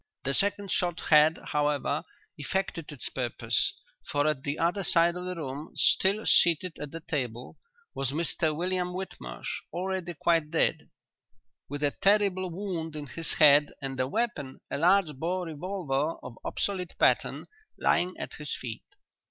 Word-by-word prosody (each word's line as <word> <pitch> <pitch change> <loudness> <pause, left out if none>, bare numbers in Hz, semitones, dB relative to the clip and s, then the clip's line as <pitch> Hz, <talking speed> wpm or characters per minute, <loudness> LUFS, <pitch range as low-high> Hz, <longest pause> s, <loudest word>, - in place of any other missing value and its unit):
The 140 - -1
second 200 +2 +1
shot 175 -2 0
had, 155 +1 +7
however, 145 0 0 0.3
effected 165 +1 -3
its 145 - -2
purpose, 125 -3 -1 0.3
for 145 0 0
at 150 -4 +1
the 140 +2 -3
other 175 +4 +1
side 170 0 +4
of 180 0 -5
the 180 0 -3
room, 150 -1 -6
still 200 +3 +3
seated 170 +1 +4
at 150 - -5
the 165 +3 -7
table, 125 -7 -4 0.3
was 135 -2 -1
Mr 155 +1 0
William 180 +1 -1
Whitmarsh, 65 - -6
already 180 -1 -3
quite 165 -1 +2
dead, 165 - +1 0.8
with 145 +1 -4
a 145 - +3
terrible 195 -1 +2
wound 170 -3 -4
in 150 -1 -5
his 160 +3 -3
head 150 -1 +6
and 135 -2 -5
the 130 - +1
weapon, 145 - -2
a - - -1
large 175 -2 +4
bore 180 +5 -1
revolver 160 -3 -2
of 125 - -7
obsolete 185 -3 -2
pattern, - - +2 0.3
lying 180 +1 +1
at - - -6
his 150 -1 -2
feet. 115 -3 -6
165 Hz, 150 wpm, -28 LUFS, 145-180 Hz, 0.8 s, had